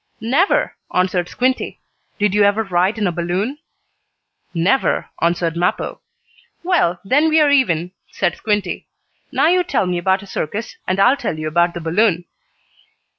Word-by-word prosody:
"Never," 270 Hz, -, +1 dB, 0.2 s
answered 180 Hz, -1 st, 0 dB
Squinty. 255 Hz, +1 st, -1 dB, 0.4 s
"Did 205 Hz, -2 st, +1 dB
you 210 Hz, -, +3 dB
ever 205 Hz, +2 st, +3 dB
ride 190 Hz, +2 st, +1 dB
in 215 Hz, -, 0 dB
a 180 Hz, -, +1 dB
balloon?" 180 Hz, -, -2 dB, 0.9 s
"Never," 185 Hz, +10 st, +1 dB
answered 170 Hz, 0 st, +1 dB
Mappo. 175 Hz, +2 st, -1 dB, 0.6 s
"Well, 335 Hz, -, +1 dB
then 290 Hz, +9 st, +3 dB
we 315 Hz, 0 st, +4 dB
are 295 Hz, -2 st, +4 dB
even," 180 Hz, -, +2 dB, 0.2 s
said 175 Hz, -, -1 dB
Squinty. 205 Hz, -4 st, -2 dB, 0.4 s
"Now -, -, +2 dB
you 360 Hz, +2 st, +4 dB
tell 280 Hz, -, 0 dB
me 180 Hz, -1 st, -1 dB
about 190 Hz, +3 st, +1 dB
a -, -, -10 dB
circus, 200 Hz, +3 st, -4 dB
and 185 Hz, +1 st, 0 dB
I'll 245 Hz, +8 st, +5 dB
tell 205 Hz, -, -3 dB
you 155 Hz, 0 st, -4 dB
about 170 Hz, +2 st, +1 dB
the 175 Hz, -, -5 dB
balloon." 175 Hz, +1 st, +1 dB
195 Hz, 155 wpm, -19 LUFS, 175-245 Hz, 0.9 s, I'll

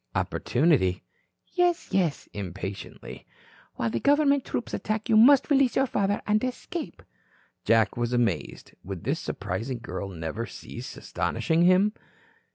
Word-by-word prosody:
"Opportunity?" 130 Hz, -, +1 dB, 0.5 s
"Yes, 355 Hz, -1 st, +1 dB
yes" 175 Hz, -6 st, 0 dB
impatiently. 95 Hz, 0 st, -7 dB, 0.5 s
"While 115 Hz, -1 st, -1 dB
the 115 Hz, -, -1 dB
government 285 Hz, -1 st, +3 dB
troops 240 Hz, -, -4 dB
attack, 215 Hz, +2 st, -2 dB
you 220 Hz, -, +4 dB
must 270 Hz, +6 st, +6 dB
release 270 Hz, -4 st, +4 dB
your 270 Hz, -, +3 dB
father 205 Hz, -4 st, 0 dB
and 215 Hz, +2 st, +2 dB
escape." 300 Hz, +6 st, -5 dB, 0.6 s
Jack 115 Hz, -1 st, +3 dB
was 120 Hz, 0 st, -1 dB
amazed. 115 Hz, -10 st, -1 dB
Would 95 Hz, -2 st, -7 dB
this -, -, -1 dB
surprising 125 Hz, +3 st, -4 dB
girl 100 Hz, -3 st, -6 dB
never 90 Hz, +6 st, -5 dB
cease -, -, -9 dB
astonishing 165 Hz, +1 st, 0 dB
him? 190 Hz, +4 st, +4 dB
170 Hz, 130 wpm, -26 LUFS, -, 0.6 s, must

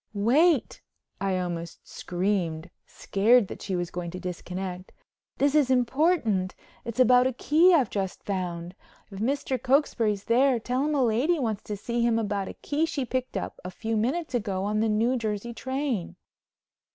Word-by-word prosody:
"Wait," 270 Hz, -, +3 dB, 0.4 s
I 195 Hz, -1 st, 0 dB
almost 170 Hz, -2 st, -5 dB
screamed, 175 Hz, -3 st, -2 dB, 0.2 s
scared 215 Hz, +2 st, +3 dB
that -, -, -8 dB
she 190 Hz, -, -3 dB
was 175 Hz, -1 st, -3 dB
going 175 Hz, -1 st, -4 dB
to 180 Hz, +2 st, -7 dB
disconnect, 180 Hz, +1 st, -6 dB, 0.5 s
"this 285 Hz, 0 st, +2 dB
is 295 Hz, -4 st, +3 dB
important. 250 Hz, -, +1 dB, 0.3 s
It's 235 Hz, +1 st, -6 dB
about 250 Hz, 0 st, +6 dB
a 260 Hz, -, -2 dB
key 315 Hz, +9 st, +4 dB
I've 280 Hz, -, +3 dB
just 195 Hz, -2 st, -3 dB
found. 175 Hz, -3 st, -4 dB, 0.4 s
If 195 Hz, -, -8 dB
Mr. 260 Hz, +2 st, -1 dB
Cokesbury's 245 Hz, -6 st, +1 dB
there 255 Hz, +1 st, +3 dB
tell 250 Hz, +4 st, -1 dB
him 305 Hz, 0 st, 0 dB
a 275 Hz, -, +3 dB
lady 250 Hz, +9 st, +2 dB
wants 220 Hz, -7 st, -2 dB
to 210 Hz, -, -4 dB
see 235 Hz, +4 st, -2 dB
him 235 Hz, -1 st, +2 dB
about 205 Hz, -3 st, -2 dB
a -, -, -7 dB
key 305 Hz, +3 st, -1 dB
she 280 Hz, -5 st, -2 dB
picked 255 Hz, +1 st, -3 dB
up -, -, -5 dB
a 180 Hz, -, -5 dB
few 225 Hz, +4 st, -3 dB
minutes 260 Hz, +7 st, -1 dB
ago 200 Hz, -5 st, -1 dB
on 210 Hz, +1 st, 0 dB
the 220 Hz, 0 st, +2 dB
New 230 Hz, +4 st, +2 dB
Jersey 220 Hz, 0 st, -3 dB
train." 260 Hz, -7 st, -3 dB
225 Hz, 170 wpm, -27 LUFS, 190-260 Hz, 0.5 s, about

